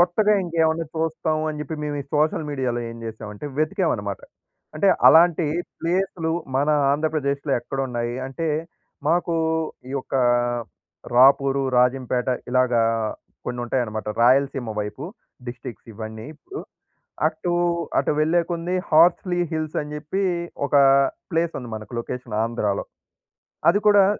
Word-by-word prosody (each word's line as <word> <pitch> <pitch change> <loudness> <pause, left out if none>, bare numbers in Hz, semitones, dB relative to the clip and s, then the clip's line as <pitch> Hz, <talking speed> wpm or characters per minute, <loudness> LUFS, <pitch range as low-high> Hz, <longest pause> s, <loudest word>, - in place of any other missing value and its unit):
కొత్తగా 205 +5 +4
ఇంకేమైనా 165 -1 +1
చూస్తాం 160 -1 -1
అని 150 - -4
చెప్పి, 155 +2 -4
మేము 145 -1 -3
ఈ - - -21
సోషల్ 155 +1 +1
మీడియా‌లో 130 -4 -1
ఏం 115 - -9
చేసామంటే 110 +2 -7
వెతికామన్నమాట. 155 - 0 0.5
అంటే 175 +6 +2 0.2
అలాంటి 165 0 +6 0.3
ప్లేసులు 175 -1 -1 0.3
మన 145 +2 +1 0.2
ఆంధ్రప్రదేశ్‌లో 145 -2 -1
ఎక్కడున్నాయి? 120 -3 -3
అంటే 160 +5 -3 0.6
మాకు 170 0 +1 0.5
ఈ 135 - -6
యొక్క 135 - -6 1.0
రాపూరు, 135 +1 +5 0.2
రాజంపేట 125 0 +1 0.2
ఇలాగ 125 0 +2 0.7
కొన్ని 120 - -4
ఉంటాయన్నమాట. 115 -4 -2
రాయలసీమ 130 -1 +3
వైపు 105 +7 -5 0.4
డిస్ట్రిక్ట్స్ 120 -1 -8
ఇవన్నీ 110 0 -7
ఇప్పుడు 145 - -9 0.7
అటు, 160 +2 -2 0.5
అటు - - +2
వెళ్ళేకొద్దీ 170 +2 +1
హార్స్‌లి 175 +3 +4
హిల్స్ 155 -2 -3
అని 150 0 -6
చెప్పి, 155 +6 -3 0.4
ఒక 145 - +2 0.5
ప్లేస్ 165 0 0
ఉంది 125 -3 -8
మనకు 110 +2 -8
లొకేషన్ 120 -2 -6
ఆంధ్రాలో. 110 -4 -1 0.8
అది 205 - +1
కూడా 200 -2 +6
145 Hz, 115 wpm, -23 LUFS, 125-165 Hz, 1.0 s, అలాంటి